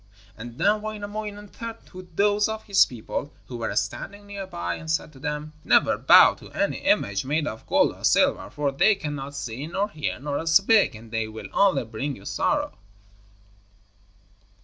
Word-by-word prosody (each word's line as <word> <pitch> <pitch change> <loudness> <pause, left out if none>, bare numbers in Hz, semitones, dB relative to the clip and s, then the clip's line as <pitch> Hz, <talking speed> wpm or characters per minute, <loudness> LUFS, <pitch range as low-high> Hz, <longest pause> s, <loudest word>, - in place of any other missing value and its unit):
And 115 +2 -9
then 210 +2 +2
Wainamoinen 210 -1 -6
turned 230 +2 -8
to 185 -1 -11
those 205 +2 +3
of 220 0 -4
his 200 -2 +4
people 125 +4 -6
who 125 - -7
were 115 -1 -3
standing 200 - -3
near 200 -1 -7
by, 85 - -3
and 160 - -8
said 160 -1 -1
to 135 - -15
them: 150 +2 -4
'Never - - +4
bow - - +7
to - - -13
any - - 0
image 100 -1 +1
made 150 +3 0
of 110 -6 -6
gold - - +3
or - - -17
silver, - - +3
for 145 -1 -1
they 200 +10 +4
cannot 145 -5 -6
see, 130 +2 -5
nor 200 +5 -2
hear, 150 -7 -3
nor 145 +3 -3
speak, 195 - +4
and 110 0 -13
they 115 -1 -1
will 110 0 -9
only 195 -8 +3
bring 120 +6 -4
you 100 - -15
sorrow.' - - -1
150 Hz, 175 wpm, -25 LUFS, 120-205 Hz, -, bow